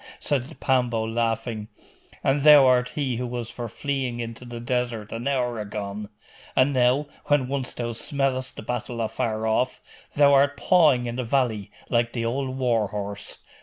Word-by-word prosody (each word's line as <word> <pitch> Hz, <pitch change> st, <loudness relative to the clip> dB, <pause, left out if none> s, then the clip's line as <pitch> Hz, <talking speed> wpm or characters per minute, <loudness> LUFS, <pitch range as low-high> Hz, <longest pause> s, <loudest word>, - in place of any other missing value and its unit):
said 135 Hz, -2 st, -2 dB
Pambo, 125 Hz, -4 st, +1 dB
laughing, 115 Hz, -1 st, -2 dB, 0.6 s
'and 140 Hz, +1 st, +2 dB
thou 145 Hz, -2 st, +8 dB
art 125 Hz, -1 st, +4 dB
he 135 Hz, -5 st, -1 dB
who 125 Hz, +1 st, -3 dB
was 120 Hz, -1 st, -4 dB
for 120 Hz, -1 st, -6 dB
fleeing 135 Hz, -2 st, -3 dB
into 115 Hz, +1 st, -6 dB
the 120 Hz, -1 st, -7 dB
desert 120 Hz, -3 st, -2 dB
an 115 Hz, +3 st, -4 dB
hour 125 Hz, -4 st, 0 dB
agone! 105 Hz, 0 st, -5 dB, 0.5 s
And 135 Hz, +2 st, +4 dB
now, 130 Hz, +3 st, +3 dB, 0.2 s
when 145 Hz, -3 st, +2 dB
once 135 Hz, -1 st, -2 dB
thou 120 Hz, -1 st, -3 dB
smellest 130 Hz, +1 st, -1 dB
the -, -, -8 dB
battle 120 Hz, +1 st, -4 dB
afar 110 Hz, -1 st, -1 dB
off, 120 Hz, +3 st, +1 dB, 0.4 s
thou 145 Hz, -1 st, +6 dB
art 140 Hz, +1 st, +4 dB
pawing 145 Hz, -3 st, +4 dB
in 120 Hz, 0 st, -4 dB
the 130 Hz, -, -1 dB
valley, 115 Hz, -5 st, 0 dB, 0.2 s
like 120 Hz, -1 st, +1 dB
the 115 Hz, -2 st, -2 dB
old 130 Hz, +2 st, -2 dB
war 120 Hz, -5 st, +1 dB
horse. 100 Hz, 0 st, -6 dB
125 Hz, 165 wpm, -25 LUFS, 115-135 Hz, 0.6 s, thou